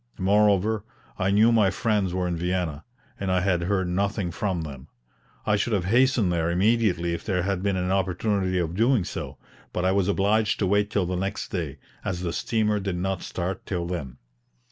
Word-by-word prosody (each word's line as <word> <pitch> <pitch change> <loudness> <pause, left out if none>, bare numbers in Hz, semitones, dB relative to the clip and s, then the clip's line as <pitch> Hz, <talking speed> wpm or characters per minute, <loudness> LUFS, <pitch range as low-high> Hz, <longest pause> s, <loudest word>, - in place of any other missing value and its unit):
Moreover, 105 +2 +3 0.4
I 95 -1 +1
knew 105 +4 +5
my 110 -4 +4
friends 105 -3 0
were 90 0 -1
in 90 - -1
Vienna, 85 -3 -2 0.4
and 95 -1 -1
I 90 -1 +2
had 90 -2 +1
heard 95 +1 0
nothing 100 0 -1
from 95 -1 -2
them. 70 -2 -8 0.6
I 105 - +3
should 105 +3 0
have 95 -4 +1
hastened 120 -2 +3
there 85 -1 0
immediately 90 -2 +2
if 85 - -4
there 90 -4 0
had 95 -1 -1
been 100 -1 0
an 90 0 -1
opportunity 95 0 0
of 85 -2 -1
doing 115 +2 +3
so; - - -6 0.3
but 90 - -2
I 95 - +3
was 95 -1 +2
obliged 105 +2 +2
to 100 - 0
wait 105 +2 +2
till 100 -3 0
the 90 +1 -2
next 95 +3 -3
day, 80 -7 -3 0.3
as 90 -3 -3
the 85 -2 -2
steamer 105 0 0
did 95 -2 -3
not 95 0 -2
start 90 +1 -4
till 90 -3 -2
then. 75 -8 -5
95 Hz, 195 wpm, -25 LUFS, 90-105 Hz, 0.6 s, knew